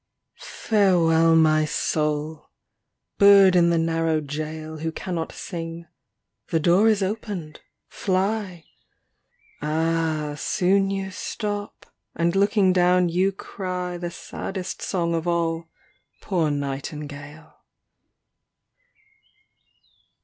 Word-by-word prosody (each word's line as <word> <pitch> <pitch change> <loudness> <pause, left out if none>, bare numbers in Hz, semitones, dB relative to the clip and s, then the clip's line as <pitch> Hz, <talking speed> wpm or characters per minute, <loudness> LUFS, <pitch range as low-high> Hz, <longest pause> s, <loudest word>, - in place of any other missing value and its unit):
XXVI - - -13
Farewell, 165 -6 +3
my 155 -1 +4
soul! 150 0 -1
ŌĆö - - -57
bird 200 -2 +7
in 170 -1 +5
the 170 - +2
narrow 165 -1 +1
jail 155 +1 -6
Who 160 +1 -2
cannot 165 -1 -4
sing. 165 0 -7 0.6
The 165 - 0
door 180 +7 +4
is 210 -2 +2
opened! 190 -6 -5 0.3
Fly! 190 -3 -2 1.0
Ah, 155 0 -1
soon 195 +4 +1
you 195 -1 -3
stop, 205 +1 -5 0.3
and 170 +2 0
looking 200 -1 +3
down 180 0 +3
you 185 +3 +1
cry 180 -2 -5
The 175 0 -4
saddest 185 +2 -6
song 170 -3 -1
of 165 +1 -2
all, 165 -1 0 0.5
poor 170 -6 0
nightingale. 145 +2 -6
170 Hz, 100 wpm, -24 LUFS, 160-190 Hz, 1.0 s, bird